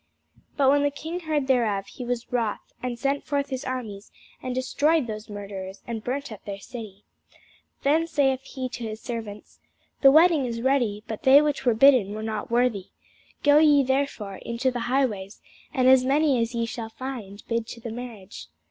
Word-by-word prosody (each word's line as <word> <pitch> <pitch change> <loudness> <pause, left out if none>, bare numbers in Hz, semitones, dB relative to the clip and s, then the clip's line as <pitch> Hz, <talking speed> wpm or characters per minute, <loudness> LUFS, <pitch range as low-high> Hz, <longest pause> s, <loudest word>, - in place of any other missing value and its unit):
But 275 -2 +5
when 285 0 +3
the 285 - +2
king 320 +5 -6
heard 310 -5 -1
thereof, 225 -7 +1
he 255 - -9
was 240 -1 -4
wroth: 230 -4 -2
and 250 - -2
he - - -7
sent 275 +4 -1
forth 285 -1 -1
his 260 -2 -4
armies, 225 -6 -5 0.3
and 255 -1 -4
destroyed 290 +3 +1
those 215 -1 -7
murderers, 195 -2 -7
and 225 -2 -5
burned 275 +2 -3
up 215 - -10
their 200 -1 -6
city. 205 -1 -10 0.8
Then 315 +4 +3
saith 270 -5 +1
he 265 -1 -5
to 240 -1 -7
his 220 -1 -5
servants, 225 -4 -7 0.4
The 275 - +8
wedding 315 -1 +5
is 230 -1 -4
ready, 240 -6 +1
but 220 - -5
they 265 +2 +8
which 295 -3 -1
were 235 - +4
bidden 225 -5 +5
were 215 - -5
not 215 -1 -4
worthy. 235 -5 +1 0.6
Go 290 +1 +6
ye 295 -3 +5
therefore 265 -7 -1
into 235 +3 -2
the 245 - -4
highways, 220 -7 -1 0.3
and 255 -1 +2
as 260 -1 +7
many 275 -1 +2
as 230 +1 -2
ye 230 0 0
shall 230 -1 -6
find, 225 -5 -7
bid 230 -1 -1
to 235 - -8
the 230 0 -6
marriage. 220 - -8
245 Hz, 190 wpm, -25 LUFS, 220-275 Hz, 0.8 s, The